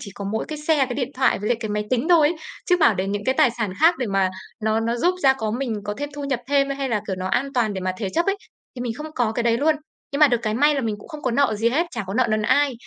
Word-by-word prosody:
chỉ 200 - -8
có 200 - -6
mỗi 220 - -1
cái 305 - -5
xe, 305 +1 +1
cái 250 - -5
điện 265 -1 -2
thoại 265 +1 +2
với 210 +3 -3
lại 240 - +2
cái 220 - -3
máy 210 0 -2
tính 255 +4 +1
thôi 320 -4 +6
ấy, 335 - -3 0.3
chứ 360 - +5
bảo 225 - +5
để 190 0 -2
những 205 +1 -3
cái 260 - +1
tài 250 - +5
sản 210 -5 -1
khác 330 +2 +6 0.2
mà 195 -1 +2 0.3
nó 220 +1 +2
nó 230 +1 -1
giúp 350 +9 +2
ra 270 - +6
có 220 -5 -3
mình 240 0 -2
có 205 - -3
thêm 290 +2 -4
thu 290 -1 -5
nhập 265 -3 -1
thêm 280 -1 +2
hay 275 -1 -2
là, 215 -4 0
kiểu, 190 -2 -3
nó 185 - -4
an 275 +8 0
toàn 225 -4 +1
để 190 - -3
mà 185 0 -1
thế 205 - -2
chấp 335 - +1
ấy, 395 0 +1 0.4
thì 245 - -8
mình 240 -2 -2
không 310 +2 -7
có 235 -3 +1
cái 235 +1 -1
đấy 230 0 +2
luôn. 310 +3 +3 0.4
Nhưng 280 - -2
mà 300 - +8
được 240 - +2
cái 215 -1 -1
may 295 +4 +4
là 275 - 0
mình 220 -4 -2
cũng - - -14
không 305 -3 -9
có 255 - 0
nợ 235 -2 +2
gì 225 +2 +2
hết, 320 +8 +1
chả 230 -5 -4
có 195 - -5
nợ 255 +1 +3
nần 215 0 +1
ai. 285 +4 +3
245 Hz, 330 wpm, -22 LUFS, 215-285 Hz, 0.4 s, mà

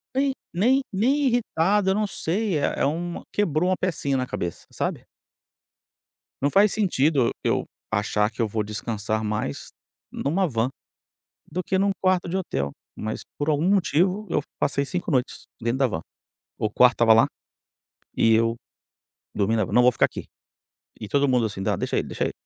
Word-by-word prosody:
Nem 275 +1 +2 0.2
nem 250 +10 +3
nem 225 +8 +2
irritado, 205 -4 +2
eu 190 - +2
não 210 0 +1
sei, 195 -1 -1
é - - 0
é - - +4
um 170 +4 -2
quebrou 180 -3 +1
uma 185 - +1
pecinha 155 -6 -1
na 130 -1 -1
cabeça, 85 -1 -5
sabe. - - -3 1.4
Não 140 - +3
faz 200 +5 +4
sentido, 150 - +2
eu - - +1 0.3
achar 105 +1 +1
que 115 - -5
eu 115 - +2
vou 110 +1 -1
descansar 110 0 -3
mais 105 -9 -3 0.4
em - - -6
uma 185 +6 +2
van 115 -3 0 0.8
do 180 - -2
que 190 - -1
em 190 - +2
um 200 - +3
quarto 185 -1 +2
de 180 - -1
hotel, 70 - -2 0.3
mas 110 +1 -4 0.2
por 145 +1 -2
algum 155 +4 +1
motivo 190 +2 +2
eu 150 - +2 0.2
passei 140 0 +1
5 180 +3 -3
noites 130 -3 -1 0.2
dentro 120 +3 -1
da 135 - +4
van. 95 -9 -3 0.6
O 110 - 0
quarto 125 +2 +5
estava 115 -1 +5
lá, 115 - +6 0.9
e 115 0 +4
eu, 115 +1 +3 0.8
dormindo 105 +2 +1
na 110 - +2
van, - - -8
"Não 125 - +5
vou 125 - +5
ficar - - +3
aqui". - - -8 0.7
E 105 - -6
todo 140 +3 +2
mundo 125 -3 +3
assim: 100 -2 -5
"ah, - - +1
deixa - - -2
ele, - - -2
deixa - - -2
ele". - - -2
145 Hz, 185 wpm, -24 LUFS, 115-185 Hz, 1.4 s, lá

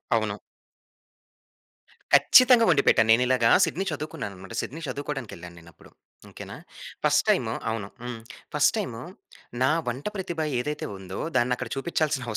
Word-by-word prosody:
అవును. - - -1 1.7
ఖచ్చితంగా 250 -3 +7
వండిపెట్టాను. 140 -7 +4
నేను 120 +3 +5
ఇలాగా 125 -3 +3 0.2
సిడ్నీ 190 +5 -3
చదువుకున్నానన్నమాట. 135 - -7
సిడ్నీ 160 +5 -7
చదువుకోవడానికి 135 -2 -5
వెళ్ళానేనప్పుడు. 85 -1 -14 0.4
ఓకేనా? - - -10 0.5
ఫస్ట్ - - +3
టైమ్ - - +2 0.2
అవును. 110 -3 -3 0.2
హ్మ్. 120 -1 -5 0.4
ఫస్ట్ - - +4
టైమ్ - - -3 0.7
నా 130 - +4 0.2
వంట 125 +4 -4
ప్రతిభ 175 -4 -5 0.2
ఏదైతే 150 +4 -3
ఉందో 95 0 -8 0.2
దాన్ని 125 0 +2
అక్కడ 125 -2 -6
చూపించాల్సిన 150 -2 -1
130 Hz, 120 wpm, -25 LUFS, 115-155 Hz, 1.7 s, ఖచ్చితంగా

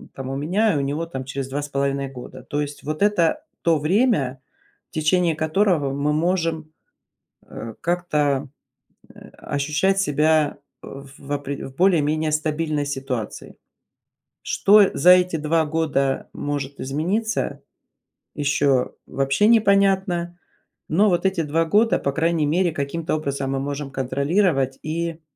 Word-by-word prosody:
по-моему, 135 0 -5
у - - -4
меня 200 +7 +2
и - - 0
у 140 - 0
него 145 +4 -2
там, 135 -5 -6
через 135 0 -4
2,5 140 -1 -2
года. 130 0 -10
То 145 +3 -3
есть 145 0 -6
вот 155 +4 -4
это 205 - +2 0.2
то 165 -1 +3
время, 155 - +1 0.5
в - - -45
течение 165 +2 +2
которого 160 -2 +1
мы 140 +2 0
можем, 165 -1 -1 0.8
э, 115 -1 -8
как-то 150 -5 0 0.9
ощущать 150 +7 0
себя 155 -2 +2 0.2
в 140 +1 -11
опре 140 0 -4
в 135 - -14
более-менее 155 -3 +2
стабильной 155 -1 -1
ситуации. 135 -5 -5 0.9
Что 205 -1 +5
за 175 +6 +5
эти 180 -2 +3
2 160 +1 +1
года 150 -4 -1
может 140 -1 -4
измениться, 180 +12 -2 0.7
еще 140 -3 +1
вообще 135 +10 +1
непонятно, 195 -5 +2 0.5
но 200 +7 +3
вот 175 -1 +1
эти 190 -3 0
2 160 +2 0
года, 210 +7 +3
по 140 - -2
крайней 165 0 +1
мере, 175 +4 +2
каким-то 150 +4 -3
образом 140 -3 -3
мы 135 - -1
можем 140 0 -4
контролировать 135 +2 0
и 165 +1 -3
155 Hz, 130 wpm, -22 LUFS, 140-175 Hz, 0.9 s, Что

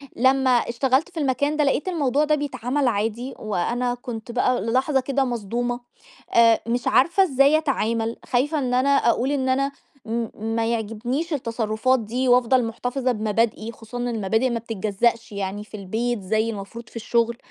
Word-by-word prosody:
لمّا 260 +1 +3
اشتغلت 255 +5 +2
في 340 - -7
المكان 285 +2 0
ده 300 - +3
لقيت 285 +4 0
الموضوع 295 -5 +1
ده 305 0 +3
بيتعمل 270 -1 -1
عادي، 230 +3 -1
وأنا 240 +5 -1
كُنت 240 -2 -7
بقى 250 +1 +1
للحظة 260 +5 +1
كده 275 +1 0
مصدومة، 240 +1 -2 0.5
آآ، 230 -1 +6
مش 240 +1 -1
عارفة 350 +8 +4
إزاي 280 -2 +4
أتعامل؟ 230 -7 -1
خايفة 290 +5 +1
إن 250 -2 -1
أنا 255 +3 +2
أقول 265 -1 +2
إن 260 -2 0
أنا 275 +2 +1 0.3
م 230 0 -2 0.3
ما 230 - +1
يعجبنيش 235 +8 -2
التصرفات 230 -1 0
دي 245 +4 -2
وأفضل 250 0 +4
مُحتَفظة 250 +3 -2
بمبادئي، 220 0 -1
خصوصًا 230 +1 -10
إن 245 0 -2
المبادئ 220 +2 0
ما 235 -1 -1
بتتجزأش 225 +1 -1
يعني، 200 +1 -4
في 215 0 -10
البيت 220 +4 -2
زي 220 +4 0
المفروض 220 +2 -7
في - - -22
الشغل، 235 +1 0
245 Hz, 160 wpm, -23 LUFS, 225-265 Hz, 0.5 s, آآ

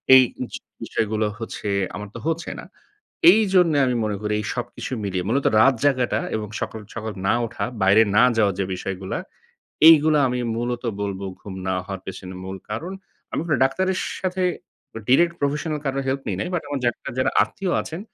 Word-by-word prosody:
এই 130 - +9 0.3
জি - - -4 0.2
বিষয়গুলো 110 0 -1
হচ্ছে 115 -2 -6 0.3
আমার 105 0 -6
তো - - -5
হচ্ছে 165 +1 -1
না। - - -9 0.7
এইজন্যে 185 -6 +4
আমি 125 - +1
মনে 105 -1 -1
করি 105 0 -2
এই - - -5
সবকিছু 120 +1 -5
মিলিয়ে 95 -2 -2
মূলত 135 +5 +1 0.2
রাত 135 +4 +6
জায়গাটা 125 -6 +2 0.2
এবং 105 -1 -4
সকাল, 110 - -4
সকাল 110 -1 -4
না - - +4
উঠা, 120 - -4 0.2
বাইরে 100 +3 +6
না 115 - +7
যাওয়ার 105 -3 +3
যে 100 - +1
বিষয়গুলা 95 +1 -4 0.7
এইগুলা 155 -1 +7
আমি 125 0 -1 0.2
মূলত 120 +1 -2 0.2
বলব 100 -2 -3 0.2
ঘুম 100 - -8
না 95 - +1
হওয়ার 95 -2 -5
পেছনে 95 -1 -7
মূল 95 +1 -5
কারণ। 160 - -4 0.4
আমি - - -1
কোন 155 - +2
ডাক্তারের 185 +8 0 0.2
সাথে 185 0 -1 0.7
ডিরেক্ট 170 +7 +4
professional 150 +2 -1
কারোর 135 0 -1
হেল্প 135 +1 -1
নি - - 0
নাই। 180 - -2
বাট 175 - 0
আমার 145 -1 -2
ডাক্তার 120 - -2
যারা 130 - +2
আত্মীয় 190 -3 -3
আছেন, 160 +3 -6
125 Hz, 180 wpm, -23 LUFS, 105-155 Hz, 0.7 s, এই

